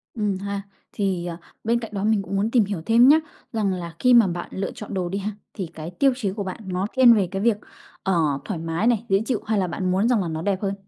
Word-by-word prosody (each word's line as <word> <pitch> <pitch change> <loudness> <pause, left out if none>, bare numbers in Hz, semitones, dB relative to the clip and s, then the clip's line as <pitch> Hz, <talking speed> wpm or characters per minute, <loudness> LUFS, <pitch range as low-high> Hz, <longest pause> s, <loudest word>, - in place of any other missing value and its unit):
Ừm 210 -4 0
ha. 200 +1 -4 0.3
Thì, 190 -4 -1
ờ, 170 -1 -5 0.3
bên 235 +2 +2
cạnh 225 -2 -7
đó 195 - -2
mình 215 -1 +2
cũng 195 0 -5
muốn 210 +3 0
tìm 235 -4 +4
hiểu 195 -5 -4
thêm 235 +2 +6
nhá, 300 +3 +7 0.3
rằng 205 -4 +1
là 170 -2 -6
khi 250 0 +4
mà 235 -4 +7
bạn 175 -1 -4
lựa 195 - -3
chọn 210 -1 -8
đồ 180 -2 -1
đi 195 - -2
ha, 205 +2 -3 0.2
thì 190 -6 -4
cái 160 +2 -7
tiêu 270 +9 +3
chí 210 -7 -2
của 205 -1 -3
bạn 185 +3 -6
nó 185 +2 -1
thiên 255 -2 +8
về 200 -5 +2
cái 195 0 -2
việc, 230 -2 +3 0.5
ờ, 190 - +1 0.3
thoải 190 -6 -3
mái 165 +7 -1
này, 235 -1 +2
dễ 195 +1 +3
chịu, 240 -4 -1
hay 220 -1 +1
là 185 - +1
bạn 185 +1 -2
muốn 195 +5 +2
rằng 235 -5 +3
là 180 - -2
nó 160 0 -3
đẹp 195 +1 -1
hơn? 195 -1 -1
200 Hz, 275 wpm, -23 LUFS, 185-220 Hz, 0.5 s, thiên